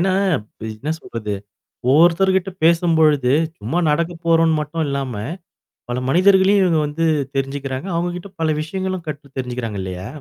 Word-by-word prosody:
ஏன்னா 185 Hz, +1 st, +2 dB, 0.6 s
என்ன 150 Hz, +8 st, -3 dB
சொல்றது, 105 Hz, -3 st, -5 dB, 0.6 s
ஒவ்வொருத்தர்கிட்ட 175 Hz, +5 st, +4 dB
பேசும்பொழுது, 160 Hz, -5 st, +4 dB, 0.3 s
சும்மா 120 Hz, +12 st, -1 dB
நடக்க 170 Hz, +3 st, +1 dB
போறோம்ன்னு 165 Hz, -1 st, +4 dB
மட்டும் 155 Hz, +2 st, -3 dB
இல்லாம, 135 Hz, -4 st, -3 dB, 0.8 s
பல 125 Hz, +1 st, -2 dB
மனிதர்களையும் 190 Hz, +3 st, +5 dB
இவங்க 170 Hz, -3 st, +2 dB
வந்து 165 Hz, +3 st, -1 dB, 0.3 s
தெரிஞ்சுக்கிறாங்க. 135 Hz, +3 st, -3 dB
அவுங்க 175 Hz, +1 st, -1 dB
கிட்ட 195 Hz, +3 st, -11 dB
பல 155 Hz, -1 st, +2 dB
விஷயங்களும் 185 Hz, +2 st, -4 dB
கற்று 145 Hz, -2 st, -7 dB
தெரிஞ்சுக்கிறாங்க 120 Hz, -5 st, -3 dB
இல்லையா? 95 Hz, 0 st, -6 dB
160 Hz, 130 wpm, -20 LUFS, 135-175 Hz, 0.8 s, மனிதர்களையும்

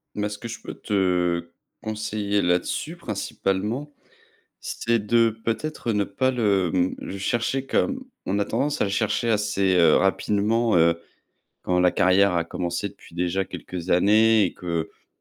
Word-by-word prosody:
Mais 105 Hz, 0 st, -1 dB
ce 105 Hz, 0 st, -7 dB
que 115 Hz, -, -7 dB
je 115 Hz, -, -7 dB
peux -, -, -8 dB
te 90 Hz, -4 st, 0 dB, 0.3 s
conseiller 105 Hz, -2 st, -1 dB
là-dessus 90 Hz, -, -1 dB
principalement, 110 Hz, -, -3 dB, 0.7 s
c'est 115 Hz, 0 st, -1 dB
de 115 Hz, +2 st, +3 dB
peut-être, 120 Hz, 0 st, -2 dB
ne 105 Hz, -1 st, +1 dB
pas 130 Hz, +7 st, 0 dB
le, 100 Hz, -8 st, +1 dB
mmh, 90 Hz, 0 st, +1 dB
le 100 Hz, -, -6 dB
chercher 120 Hz, +6 st, -1 dB
comme 265 Hz, -, 0 dB, 0.2 s
on 100 Hz, +2 st, 0 dB
a 100 Hz, -, +1 dB
tendance 145 Hz, +1 st, -1 dB
à -, -, +4 dB
le 100 Hz, -, -2 dB
chercher 110 Hz, +3 st, 0 dB
assez, 105 Hz, -3 st, +1 dB
heu, 85 Hz, -3 st, +6 dB
rapidement, 105 Hz, +3 st, +1 dB
heu, 85 Hz, 0 st, +3 dB, 0.6 s
quand 90 Hz, 0 st, +1 dB
la 90 Hz, 0 st, +4 dB
carrière 95 Hz, +1 st, +4 dB
a 85 Hz, -1 st, +1 dB
commencé 85 Hz, +4 st, -3 dB
depuis 100 Hz, -3 st, -18 dB
déjà 90 Hz, +2 st, 0 dB
quelques 90 Hz, 0 st, -7 dB
années 110 Hz, +4 st, +5 dB
et -, -, -3 dB
qu'on 85 Hz, -3 st, -5 dB
100 Hz, 160 wpm, -24 LUFS, 90-115 Hz, 0.7 s, heu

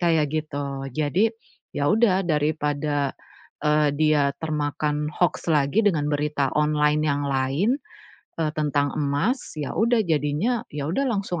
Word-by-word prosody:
kayak 165 Hz, -3 st, +3 dB
gitu. 140 Hz, -3 st, -3 dB
Jadi, 165 Hz, +9 st, +2 dB, 0.5 s
ya 145 Hz, 0 st, +1 dB
udah, 200 Hz, -4 st, +3 dB
daripada, 150 Hz, -2 st, 0 dB, 0.5 s
eee, 150 Hz, 0 st, +3 dB
dia 150 Hz, -2 st, +3 dB
termakan 150 Hz, -1 st, -1 dB
hoaks 175 Hz, -1 st, 0 dB
lagi 150 Hz, +6 st, +3 dB
dengan 155 Hz, -7 st, +2 dB
berita 145 Hz, -2 st, 0 dB
online 150 Hz, 0 st, +2 dB
yang 145 Hz, -1 st, 0 dB
lain, 140 Hz, -, +1 dB, 0.6 s
eee, 155 Hz, -2 st, -1 dB
tentang 145 Hz, -2 st, +1 dB
emas, 145 Hz, -, -1 dB
iya 145 Hz, -, -3 dB
udah 230 Hz, 0 st, +3 dB
jadinya 160 Hz, -, 0 dB
iya 145 Hz, -1 st, -3 dB
udah 275 Hz, +10 st, 0 dB
langsung 195 Hz, -6 st, -2 dB
150 Hz, 130 wpm, -24 LUFS, 145-170 Hz, 0.6 s, kayak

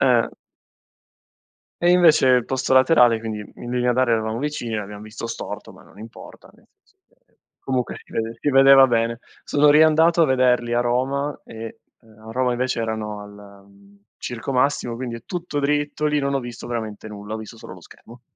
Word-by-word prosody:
Eh. 125 Hz, -4 st, +3 dB, 1.5 s
E 175 Hz, -, +4 dB
invece 170 Hz, -7 st, +5 dB
il 125 Hz, -2 st, +3 dB
posto 130 Hz, 0 st, -2 dB
laterale, 130 Hz, -4 st, +5 dB
quindi 110 Hz, -2 st, -5 dB, 0.2 s
in 120 Hz, -, -8 dB
linea 125 Hz, 0 st, +1 dB
d'aria 120 Hz, -2 st, +2 dB
eravamo 110 Hz, +1 st, -2 dB
vicini, 140 Hz, -5 st, -4 dB
l'abbiam 105 Hz, 0 st, -6 dB
visto 110 Hz, +2 st, -8 dB
storto, 115 Hz, -, -7 dB
ma -, -, -17 dB
non -, -, -20 dB
importa, 110 Hz, +2 st, -13 dB
nel -, -, -25 dB, 0.2 s
senso -, -, -34 dB, 0.3 s
che -, -, -39 dB, 0.2 s
comunque 130 Hz, -3 st, -2 dB
si -, -, -27 dB
vede 115 Hz, 0 st, -3 dB
si -, -, -1 dB
vedeva 135 Hz, 0 st, +7 dB
bene. 115 Hz, -1 st, 0 dB, 0.3 s
Sono 150 Hz, 0 st, +3 dB
riandato 160 Hz, +3 st, +5 dB
a -, -, +6 dB
vederli 125 Hz, -2 st, +2 dB
a 120 Hz, -, +2 dB
Roma 130 Hz, +4 st, -1 dB
e, 115 Hz, 0 st, -9 dB, 0.2 s
ehm, 110 Hz, -2 st, -22 dB
a -, -, -7 dB
Roma 125 Hz, +1 st, 0 dB
invece 125 Hz, -1 st, -2 dB
erano 110 Hz, -2 st, -4 dB
al, 100 Hz, -1 st, -14 dB
mhmm, 100 Hz, 0 st, -22 dB, 0.2 s
Circo 120 Hz, +3 st, -5 dB
Massimo, 125 Hz, -2 st, 0 dB
quindi 115 Hz, -2 st, -6 dB
tutto 170 Hz, -5 st, -4 dB
dritto 145 Hz, +1 st, -1 dB
lì, 150 Hz, 0 st, +1 dB
non 140 Hz, -1 st, -1 dB
ho 135 Hz, -, 0 dB
visto 120 Hz, -1 st, -9 dB
veramente 110 Hz, -3 st, -5 dB
nulla, 105 Hz, 0 st, -8 dB
ho -, -, -3 dB
visto 110 Hz, +1 st, -10 dB
solo 90 Hz, -, -10 dB
lo 90 Hz, -, -14 dB
schermo. 120 Hz, +7 st, -16 dB
120 Hz, 185 wpm, -22 LUFS, 110-135 Hz, 1.5 s, vedeva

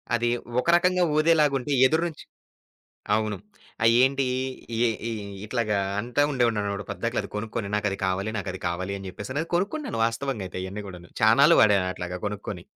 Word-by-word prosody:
అది 120 Hz, 0 st, +1 dB, 0.3 s
ఒక 125 Hz, -, -3 dB
రకంగా 180 Hz, +1 st, +3 dB
ఊదేలాగా 155 Hz, -2 st, +4 dB
ఉంటే 145 Hz, +4 st, -5 dB, 0.2 s
ఎదురు 160 Hz, +4 st, +1 dB
నుంచి 160 Hz, -, -10 dB, 0.9 s
అవును. 110 Hz, -1 st, -1 dB, 0.5 s
ఆ! -, -, +4 dB, 0.2 s
ఏంటీ? 135 Hz, 0 st, +3 dB, 0.5 s
ఈ, -, -, -1 dB, 0.3 s
ఈ -, -, -3 dB, 0.3 s
ఇట్లాగా 110 Hz, -3 st, 0 dB, 0.2 s
అంటూ 125 Hz, +6 st, +1 dB
ఉండేవాడినన్నమాట, 105 Hz, -6 st, 0 dB
పద్దాక 115 Hz, +1 st, -3 dB
అది -, -, -9 dB
కొనుక్కొని. 110 Hz, 0 st, -3 dB
నాకది 105 Hz, -2 st, -1 dB
కావాలి, 95 Hz, +3 st, -1 dB
నాకది 95 Hz, -2 st, -4 dB
కావాలి 90 Hz, +3 st, -3 dB
అని 95 Hz, -1 st, -8 dB
చెప్పేసి. 105 Hz, +7 st, -7 dB
అది -, -, -14 dB
కొనుక్కున్నాను. 225 Hz, -, -2 dB
వాస్తవంగా 115 Hz, -2 st, -2 dB
అయితే 90 Hz, -, -6 dB
ఇయన్నీ 100 Hz, +3 st, -6 dB
కూడా 90 Hz, -2 st, -9 dB, 0.2 s
చానాళ్లు -, -, +6 dB
వాడా 105 Hz, -2 st, +6 dB, 0.2 s
అట్లాగా 90 Hz, 0 st, -5 dB
కొనుక్కొని. 105 Hz, 0 st, -5 dB
110 Hz, 160 wpm, -25 LUFS, 100-140 Hz, 0.9 s, చానాళ్లు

